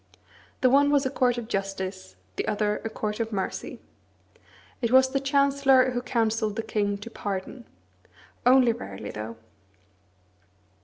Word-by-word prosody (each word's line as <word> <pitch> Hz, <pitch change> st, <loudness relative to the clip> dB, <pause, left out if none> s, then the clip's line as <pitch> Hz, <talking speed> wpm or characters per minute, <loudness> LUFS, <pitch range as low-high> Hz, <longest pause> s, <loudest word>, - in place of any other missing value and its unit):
The 255 Hz, -, +5 dB
one 285 Hz, +1 st, +5 dB
was 285 Hz, -1 st, +3 dB
a 260 Hz, -, -1 dB
court 245 Hz, -1 st, +1 dB
of 235 Hz, -2 st, -5 dB
justice, 195 Hz, -, -4 dB, 0.2 s
the -, -, -3 dB
other 210 Hz, 0 st, 0 dB
a 225 Hz, -, -3 dB
court 210 Hz, 0 st, -4 dB
of 225 Hz, 0 st, -2 dB
mercy. 195 Hz, -3 st, -4 dB, 1.0 s
It 235 Hz, -, +1 dB
was 260 Hz, 0 st, +5 dB
the 275 Hz, -, +1 dB
Chancellor 275 Hz, -2 st, +3 dB
who 245 Hz, 0 st, -2 dB
counselled 225 Hz, -3 st, 0 dB
the 225 Hz, -, -2 dB
king 205 Hz, -2 st, -1 dB
to 210 Hz, +3 st, -10 dB
pardon; 205 Hz, +5 st, -5 dB, 0.8 s
only 250 Hz, -1 st, +5 dB
rarely, 95 Hz, -, -8 dB
though. 110 Hz, +1 st, -7 dB
230 Hz, 145 wpm, -26 LUFS, 205-260 Hz, 1.0 s, The